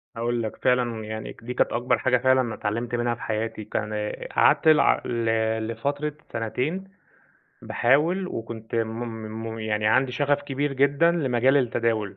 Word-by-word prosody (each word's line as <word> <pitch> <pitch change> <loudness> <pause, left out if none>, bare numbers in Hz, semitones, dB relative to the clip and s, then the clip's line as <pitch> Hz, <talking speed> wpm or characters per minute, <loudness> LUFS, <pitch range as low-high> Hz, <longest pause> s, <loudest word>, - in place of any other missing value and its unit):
هاقول 120 0 -1
لَك، 110 - -4
فعلًا 120 -3 0
يعني 110 0 -5
دي 125 +2 -5
كانت - - +1
أكبر 120 0 +1
حاجة 125 +2 +2
فعلًا 130 +1 +3
أنا 115 -3 -3
اتعلمت 115 +3 -2
منها 120 0 0
في 120 - -15
حياتي، 110 0 -3
كان 105 +1 -3
آآ، 105 0 -4
قعدت - - +4
ل 115 -6 +2
لفترة 145 +6 -2 0.2
سنتين 125 - -2 0.8
باحاول، 160 +10 +2
وكنت 115 -6 -6
م 115 0 -1 0.5
م - - -7
يعني 105 -1 -1
عندي 130 +3 +3
شغف 145 +2 +1
كبير 145 0 -2
جدًا 140 +5 +3
لمجال 135 -4 +2
التداول. 115 -5 0
120 Hz, 155 wpm, -25 LUFS, 110-135 Hz, 0.8 s, قعدت